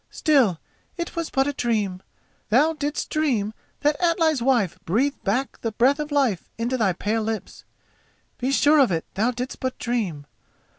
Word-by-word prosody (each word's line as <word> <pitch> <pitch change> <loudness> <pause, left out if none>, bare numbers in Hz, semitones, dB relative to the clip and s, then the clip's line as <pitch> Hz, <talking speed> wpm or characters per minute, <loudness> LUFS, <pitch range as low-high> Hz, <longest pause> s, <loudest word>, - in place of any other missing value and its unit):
"Still, 260 - +2 0.4
it 340 0 -4
was 335 -1 -2
but 270 0 +1
a 285 - -1
dream. 210 -8 -1 0.5
Thou 290 +9 +4
didst 295 -1 -3
dream 245 -9 0 0.3
that 295 +2 +1
Atli's 330 -5 +2
wife 235 -9 +1
breathed 250 +11 0
back 250 +7 -1
the 225 - -2
breath 260 +6 +3
of 300 0 -4
life 265 -11 +1
into 235 +3 -1
thy 210 -7 +2
pale 215 +5 -1
lips—be 225 +3 -7
sure 295 +2 +5
of 265 -7 +4
it 165 -2 -1
thou 220 +5 +1
didst 250 +1 -5
but 260 -1 -3
dream. 200 -12 -2
250 Hz, 160 wpm, -24 LUFS, 215-290 Hz, 0.5 s, sure